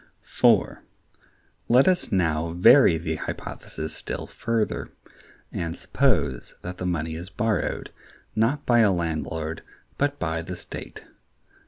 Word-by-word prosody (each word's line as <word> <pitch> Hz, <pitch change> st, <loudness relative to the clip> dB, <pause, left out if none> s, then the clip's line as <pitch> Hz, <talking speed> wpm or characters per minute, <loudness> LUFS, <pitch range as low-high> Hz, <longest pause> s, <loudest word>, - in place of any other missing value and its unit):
(4.) -, -, +2 dB, 0.9 s
Let 125 Hz, +3 st, +6 dB
us 185 Hz, -1 st, +2 dB
now 80 Hz, -3 st, +1 dB
vary 90 Hz, +1 st, +7 dB
the 80 Hz, -1 st, -3 dB
hypothesis 80 Hz, +1 st, -6 dB
still -, -, -5 dB
further, 110 Hz, -, -2 dB, 0.6 s
and 85 Hz, 0 st, -3 dB
suppose 80 Hz, -, 0 dB
that 90 Hz, +1 st, -6 dB
the 90 Hz, -, -2 dB
money 80 Hz, -2 st, -1 dB
is 85 Hz, +3 st, -6 dB
borrowed, 110 Hz, +4 st, -1 dB, 0.4 s
not 115 Hz, +7 st, +1 dB
by 120 Hz, -1 st, +4 dB
a 110 Hz, -3 st, +5 dB
landlord, 80 Hz, -2 st, -2 dB, 0.4 s
but 145 Hz, 0 st, +1 dB
by 80 Hz, -1 st, -2 dB
the 90 Hz, +2 st, -6 dB
state. 85 Hz, -, -8 dB
90 Hz, 125 wpm, -25 LUFS, 80-115 Hz, 0.9 s, vary